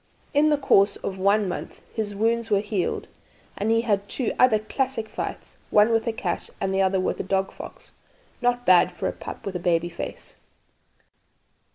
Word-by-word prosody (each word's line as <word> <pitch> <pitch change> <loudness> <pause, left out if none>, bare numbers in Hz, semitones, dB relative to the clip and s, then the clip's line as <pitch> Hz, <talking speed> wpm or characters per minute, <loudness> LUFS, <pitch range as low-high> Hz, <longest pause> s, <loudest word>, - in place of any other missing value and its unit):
In 300 +1 +4
the 295 - +3
course 200 -7 +4
of 190 -1 -5
one 200 +2 +3
month 175 - -6
his 210 -3 -3
wounds 230 +2 0
were 205 -2 +3
healed, 205 -3 -2 0.5
and 210 - -1
he 225 0 +3
had 205 -3 0
two 255 - -1
other 250 -4 +6
classical 225 0 -3
fights, - - -5
one 210 +2 +5
with 225 0 +1
a - - +2
cat 180 -6 -3
and 195 0 -1
the 190 - +2
other 190 0 +2
with 185 - -1
a - - -1
dog 190 0 0
fox. - - -11 0.5
Not 245 0 +1
bad 180 -1 +6
for - - -3
a - - 0
pup - - -9
with 195 -2 -4
a - - -1
'baby 175 -1 +1
face?' 170 - -7
210 Hz, 190 wpm, -25 LUFS, 190-230 Hz, 0.5 s, other